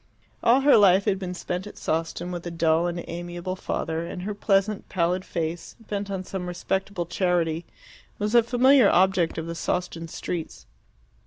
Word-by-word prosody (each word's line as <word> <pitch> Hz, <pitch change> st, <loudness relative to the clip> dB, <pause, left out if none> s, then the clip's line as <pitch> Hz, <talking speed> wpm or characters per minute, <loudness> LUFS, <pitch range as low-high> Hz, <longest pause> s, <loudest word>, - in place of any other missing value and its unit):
All 250 Hz, +4 st, +5 dB
her 280 Hz, -2 st, +6 dB
life 195 Hz, -2 st, +5 dB
had 195 Hz, -3 st, +1 dB
been 180 Hz, -2 st, -5 dB
spent 180 Hz, +2 st, -4 dB
at -, -, -11 dB
Sawston 165 Hz, +2 st, -2 dB
with 175 Hz, -1 st, -5 dB
a -, -, -2 dB
dull 165 Hz, 0 st, +2 dB
and 175 Hz, 0 st, -4 dB
amiable 175 Hz, +2 st, -5 dB
father, 165 Hz, -3 st, -3 dB
and 180 Hz, +1 st, -6 dB
her 210 Hz, +2 st, -3 dB
pleasant, 200 Hz, 0 st, 0 dB
pallid 180 Hz, +1 st, 0 dB
face, 165 Hz, -1 st, -4 dB
bent 205 Hz, -3 st, -4 dB
on 190 Hz, -1 st, -3 dB
some 185 Hz, -1 st, -5 dB
respectable 190 Hz, +1 st, -2 dB
charity, 170 Hz, -2 st, 0 dB, 0.5 s
was 210 Hz, +1 st, -2 dB
a 240 Hz, -, +7 dB
familiar 250 Hz, 0 st, +5 dB
object 185 Hz, -2 st, +3 dB
of 160 Hz, -, -3 dB
the 165 Hz, -, -4 dB
Sawston 170 Hz, -1 st, -3 dB
streets. 165 Hz, 0 st, -5 dB
180 Hz, 170 wpm, -25 LUFS, 170-200 Hz, 0.5 s, a